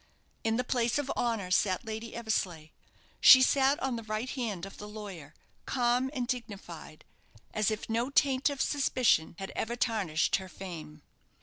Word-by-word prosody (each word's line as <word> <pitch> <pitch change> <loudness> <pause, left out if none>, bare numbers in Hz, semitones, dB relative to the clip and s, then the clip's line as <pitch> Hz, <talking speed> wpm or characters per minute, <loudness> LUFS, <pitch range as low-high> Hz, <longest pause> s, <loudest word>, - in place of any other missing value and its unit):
In 225 0 +1
the 250 - 0
place 240 -1 0
of 290 -2 -2
honour 225 -6 -1
sat 185 +3 +2
Lady 220 +1 -6
Eversleigh. 185 -9 -2 0.5
She 260 -1 +9
sat 270 +1 +3
on 260 -3 -1
the - - -5
right 215 +4 -3
hand 215 -9 -3
of 195 - -11
the 210 - -7
lawyer, 195 -8 -9 0.3
calm 250 0 +1
and 255 -4 -3
dignified, 200 - -6 0.5
as 215 -1 +1
if 215 -1 -4
no 230 +3 0
taint 275 -1 +3
of 280 -2 -3
suspicion 255 - +2
had 195 - -6
ever 235 +2 -2
tarnished 205 -10 +1
her 190 -1 -9
fame. 160 -6 -9
225 Hz, 165 wpm, -30 LUFS, 190-250 Hz, 0.5 s, She